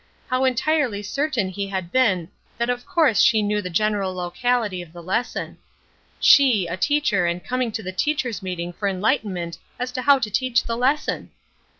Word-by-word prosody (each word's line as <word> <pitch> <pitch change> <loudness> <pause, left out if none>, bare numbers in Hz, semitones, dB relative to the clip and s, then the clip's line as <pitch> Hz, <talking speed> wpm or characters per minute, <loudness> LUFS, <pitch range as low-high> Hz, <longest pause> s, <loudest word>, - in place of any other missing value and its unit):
How 255 +1 +1
entirely 260 -4 +1
certain 260 -3 -1
he 195 +1 -4
had 190 -3 -4
been 195 -10 +2 0.3
that 235 +1 0
of 245 0 -5
course 310 - +3
she 225 -5 +4
knew 210 0 0
the 180 - -5
general 200 0 0
locality 200 +2 -1
of 170 -2 -12
the 175 -1 -10
lesson. 225 +8 -3 0.6
She 250 -9 +6
a 170 0 -3
teacher 225 -5 +1
and 175 +1 -3
coming 255 -2 -1
to 220 0 -5
the 185 - -4
teachers' 250 +2 -1
meeting 175 -2 -4
for 200 +3 -3
enlightenment 190 -4 -1 0.2
as 250 0 -3
to 255 - -3
how 280 +2 +5
to 225 -5 -3
teach 240 +2 +1
the 230 - -3
lesson! 265 +5 0
215 Hz, 180 wpm, -23 LUFS, 185-255 Hz, 0.6 s, She